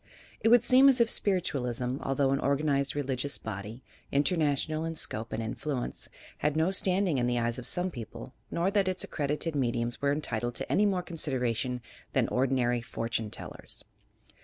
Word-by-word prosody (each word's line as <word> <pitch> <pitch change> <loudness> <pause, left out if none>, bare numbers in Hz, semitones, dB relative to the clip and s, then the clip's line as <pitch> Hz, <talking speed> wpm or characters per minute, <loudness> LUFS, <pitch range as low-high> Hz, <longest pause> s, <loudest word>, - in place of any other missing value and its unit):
It 225 - +3
would 240 0 +7
seem 260 +2 +7
as 265 -2 +3
if 230 -1 +4
Spiritualism, 130 - 0
although 135 0 +1
an 135 - +2
organ 140 +2 +1
ized 140 0 +1
religious 140 -1 -2
body, 110 +3 -7 0.3
international 155 0 +1
in 165 0 -3
scope 115 -6 -2
and 115 - -2
influence, 125 +3 -4 0.3
had 150 +1 +1
no 160 +4 +3
standing 185 -5 +2
in 120 - +1
the 120 0 +1
eyes 120 +1 0
of 125 - -1
some 180 +5 +3
people 115 -8 -8 0.2
nor 175 +3 0
that 200 -2 +2
its 185 0 -1
accredited 150 +2 -1
mediums 120 -3 -1
were 140 0 +2
entitled 120 -5 -2
to - - -4
any 210 +1 +4
more 185 -3 0
consid 160 -5 -1
eration 125 +1 -1 0.3
than - - +2
ordinary 125 -2 +1
"fortune 115 -1 -3
tellers." - - -7
140 Hz, 175 wpm, -29 LUFS, 120-170 Hz, 0.3 s, would